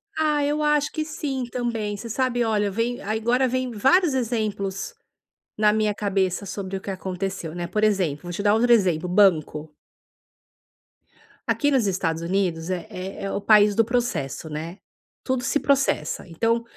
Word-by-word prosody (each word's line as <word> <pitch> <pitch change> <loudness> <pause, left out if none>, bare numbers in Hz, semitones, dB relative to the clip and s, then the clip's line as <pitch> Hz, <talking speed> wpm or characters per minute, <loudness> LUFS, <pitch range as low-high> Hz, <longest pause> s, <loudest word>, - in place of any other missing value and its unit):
Ah, 300 -2 +1
eu 295 +1 0
acho 300 -1 +2
que 310 - -2
sim 280 -4 -3
também, 230 -4 -2
você 225 +4 -7
sabe, 245 +1 0
olha, 210 -2 +1
vem, 230 +5 -2
agora 230 +5 +1
vem 255 0 -1
vários 290 - +3
exemplos 220 - -2 0.6
na 210 0 +4
minha 215 -1 +1
cabeça 195 -2 -1
sobre 195 0 -5
o - - -5
que 195 - -6
aconteceu, 185 -3 -4
né. 175 -1 -4
Por 210 +4 0
exemplo, 185 -9 +1
vou 175 - -5
te 190 - -3
dar 205 0 +4
outro 240 +2 +3
exemplo, 180 -7 +3
banco. 160 -5 +2 1.7
Aqui 290 - +2
nos 255 -6 +2
Estados 165 -4 -1
Unidos 170 -2 -1
é 180 -3 -3 0.4
é 195 - -3
o 200 - -2
país 210 0 +5
do 225 - +5
processo, 215 - -2
né, 160 +4 -6 0.5
tudo 260 -1 -1
se 290 - +1
processa, 270 - 0
então, 230 +7 0
210 Hz, 160 wpm, -24 LUFS, 185-245 Hz, 1.7 s, país